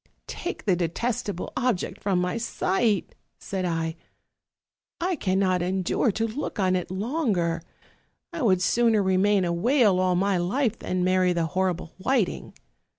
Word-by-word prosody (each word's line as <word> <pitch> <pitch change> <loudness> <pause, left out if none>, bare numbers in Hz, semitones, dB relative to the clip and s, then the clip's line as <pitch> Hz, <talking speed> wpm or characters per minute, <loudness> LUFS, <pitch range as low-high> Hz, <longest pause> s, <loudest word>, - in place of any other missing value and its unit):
'Take 350 - -6
the 190 -4 +3
detest 215 +8 -2
able 185 -3 -5
object 250 -7 -1
from 195 -3 +1
my 180 +2 -1
sight,' 220 -2 0 0.2
said 190 -2 -4
I, 165 -2 -1 1.0
'I 360 +1 0
cannot 185 -4 +1
endure 185 +5 +1
to 225 - 0
look 270 +7 -5
on 185 -2 +2
it 180 -1 -2
longer. 190 - -1 0.7
1 335 -4 -4
would 185 -5 +3
sooner 225 0 +3
remain 190 +1 +3
a 170 - 0
whale 215 0 +3
all 185 -1 +2
my 195 +1 +2
life 220 +6 0
than 180 0 -1
marry 185 0 +3
the 170 -1 0
horrible 180 -1 -2
Whiting.' 230 -1 -1
190 Hz, 150 wpm, -25 LUFS, 180-230 Hz, 1.0 s, the